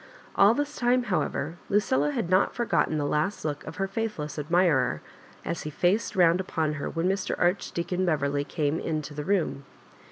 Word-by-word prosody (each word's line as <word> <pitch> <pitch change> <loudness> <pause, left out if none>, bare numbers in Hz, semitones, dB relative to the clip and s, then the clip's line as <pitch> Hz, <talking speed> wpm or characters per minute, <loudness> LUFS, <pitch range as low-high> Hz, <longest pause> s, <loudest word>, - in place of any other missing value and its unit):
AH 200 +3 +6
this 290 +3 -2
tune, 245 +1 +2
however, 175 -6 -2
Lucilla 150 -8 +2
had 150 - -2
not 185 +2 +2
forgotten 230 -9 +1
the 145 - -1
last 155 +6 -1
look 150 -1 -3
of 160 - -7
her 195 +1 -1
faithless 190 - -4
admirer 165 0 +2 0.5
as 170 - -3
he 150 - -5
faced 180 +9 0
round 175 -1 +4
upon 160 -5 -1
her 145 -2 -4
when 165 +2 -1
Mr. 195 0 -1
Archdeacon 180 0 0
Beverley 145 -4 0
came 150 +1 -1
into 155 -2 -3
the 150 0 -4
room. 175 -6 0
170 Hz, 170 wpm, -27 LUFS, 150-195 Hz, 0.5 s, AH